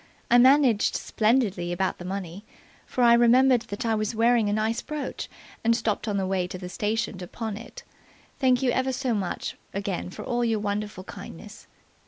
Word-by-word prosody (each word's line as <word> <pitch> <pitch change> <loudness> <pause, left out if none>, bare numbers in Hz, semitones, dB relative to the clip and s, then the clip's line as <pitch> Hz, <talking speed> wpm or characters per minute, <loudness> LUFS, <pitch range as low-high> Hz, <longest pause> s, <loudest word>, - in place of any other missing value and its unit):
I 240 - +7
managed 260 -4 +5
splendidly 215 -6 +1
about 185 +2 -1
the 175 - -8
money, 190 0 -5 0.4
for 250 - 0
I 235 -1 +7
remembered 245 +1 +5
that 205 +5 -4
I 225 - +2
was 215 +1 -1
wearing 230 -1 +3
a - - 0
nice 220 +2 0
brooch, 300 -2 -5 0.3
and 230 +1 +3
stopped 220 -1 -2
on 205 -2 0
the 190 - 0
way 185 -1 0
to 185 - -7
the 180 -1 -7
station 215 0 -2
to 180 - -7
pawn 220 +1 -5
it. 230 +3 -10 0.6
"Thank 255 -1 +3
you 250 - +3
ever 260 +1 0
so 255 -1 -1
much 195 -5 -3 0.2
again 195 -3 -3
for - - -8
all 240 0 0
your 225 -2 +1
wonderful 205 -1 -3
kindness. 205 +2 -11
220 Hz, 190 wpm, -26 LUFS, 200-240 Hz, 0.6 s, I